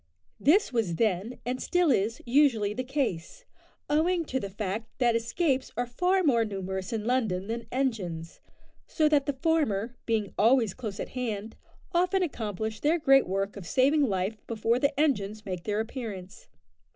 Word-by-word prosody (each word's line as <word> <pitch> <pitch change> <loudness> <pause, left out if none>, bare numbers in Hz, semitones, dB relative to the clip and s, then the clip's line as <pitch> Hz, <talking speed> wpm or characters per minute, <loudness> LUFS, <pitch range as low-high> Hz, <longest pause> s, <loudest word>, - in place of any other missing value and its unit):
This 340 +1 +3
was 215 -8 0
then, 215 +3 0
and 255 +1 -2
still 355 -4 +2
is, 225 0 0
usually 240 -6 +3
the 255 - -3
case, 265 - -3 0.4
owing 330 +3 +2
to 260 -2 -2
the 200 - -5
fact 210 +2 -4
that 240 -3 +3
escapes 260 +4 0
are 245 - +1
far 360 +10 +1
more 240 -7 +3
numerous 190 -1 -4
in 220 -2 -3
London 220 -7 0
than 230 +2 -4
engines, 195 -11 -2 0.5
so 310 -2 +2
that 295 -2 +2
the 285 - +1
former, 245 - +1
being 220 -4 0
always 225 -2 +4
close 215 -6 -6
at - - -4
hand, 225 -4 -4 0.4
often 365 +2 +2
accomplish 220 - -3
their 310 +7 +2
great 270 -4 +4
work 195 +2 -2
of 195 -5 -8
saving 275 - +3
life 195 +2 -1
before 230 +1 +1
the 280 +1 0
engines 215 -8 0
make 180 -3 -5
their 210 0 0
appearance. 215 -5 -6
230 Hz, 165 wpm, -28 LUFS, 205-280 Hz, 0.5 s, always